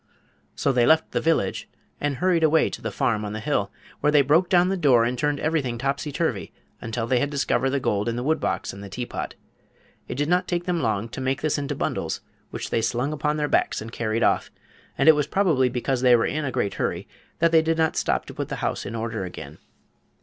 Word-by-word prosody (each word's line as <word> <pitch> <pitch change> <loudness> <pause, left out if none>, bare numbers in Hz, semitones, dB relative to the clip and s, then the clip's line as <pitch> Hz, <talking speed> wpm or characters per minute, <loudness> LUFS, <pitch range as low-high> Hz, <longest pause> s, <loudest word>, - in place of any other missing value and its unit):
So 140 - +1
they 125 -2 +3
left 160 0 +4
the - - 0
village 160 -12 0 0.3
and 145 -1 -1
hurried 175 +2 +2
away 160 0 +4
to - - -7
the - - -3
farm 110 -2 0
on 105 0 -4
the 110 - -4
hill, - - -1 0.3
where 150 - +2
they 145 -1 +5
broke 160 +6 +3
down 180 0 +4
the 195 - +1
door 135 -10 +4
and 125 +2 -1
turned 145 +3 0
everything 145 -7 -1
topsy 140 +4 -2
turvy 140 - -2 0.3
until 115 +1 -3
they 125 +1 +2
had 145 - 0
discovered 140 -2 0
the 140 +1 0
gold 105 -2 0
in 115 - -2
the 120 - -3
wood 155 +4 +1
box - - -2
and 100 +1 -9
the 100 - -8
teapot. 120 +5 -5 0.7
It - - -5
did 145 +2 -1
not 180 +2 +2
take 175 -1 -1
them 175 -2 0
long 110 -3 0
to 130 - -6
make 135 +2 -1
this 155 -1 +1
into 145 0 -3
bundles, - - -2 0.3
which - - -6
they 115 - +1
slung 125 +5 -1
upon 150 0 -1
their 150 -1 0
backs - - +1
and 110 +1 -8
carried 115 -1 -1
off, - - +2 0.5
and - - +2
it 160 - +10
was 150 -1 0
probably 155 -8 +2
because 125 +1 -1
they 125 -1 +6
were 115 - +2
in 155 0 -2
a 135 - -2
great 100 - -1
hurry - - -3 0.3
that 170 0 +3
they 160 -1 +6
did 160 0 0
not 160 -1 +1
stop - - 0
to - - -9
put - - -4
the - - -3
house - - -2
in - - -5
order 115 -2 -3
again. 80 -5 -8
135 Hz, 240 wpm, -24 LUFS, 115-155 Hz, 0.7 s, it